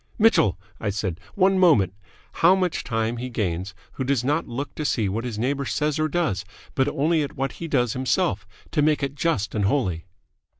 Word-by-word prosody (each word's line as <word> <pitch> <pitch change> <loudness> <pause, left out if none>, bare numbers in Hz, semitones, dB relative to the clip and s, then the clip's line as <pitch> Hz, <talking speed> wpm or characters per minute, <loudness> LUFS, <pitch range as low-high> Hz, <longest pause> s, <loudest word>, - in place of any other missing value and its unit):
"Mitchell," 210 - +4 0.2
I 105 - -1
said, 95 -4 -2 0.2
"one 190 -1 +4
moment. 115 - +5 0.5
How 175 +3 +7
much 185 -3 -1
time 115 0 -1
he 125 +2 -4
gains 95 -4 -2 0.2
who 130 - -4
does 130 -2 +1
not 150 +5 0
look 135 +5 -5
to 155 - -4
see 115 -7 +1
what 110 +4 -2
his 115 -4 -4
neighbour 140 +5 -1
says 150 +2 0
or 155 - +2
does, 155 - 0 0.3
but 135 0 +2
only 155 +3 +1
at 145 - -4
what 135 0 -1
he 170 - -7
does 125 -6 +1
himself, 105 -7 0 0.2
to 150 - +2
make 150 -1 +2
it 140 0 -1
just 145 -8 -1
and 105 -3 0
holy." 95 - 0
130 Hz, 200 wpm, -24 LUFS, 105-155 Hz, 0.5 s, How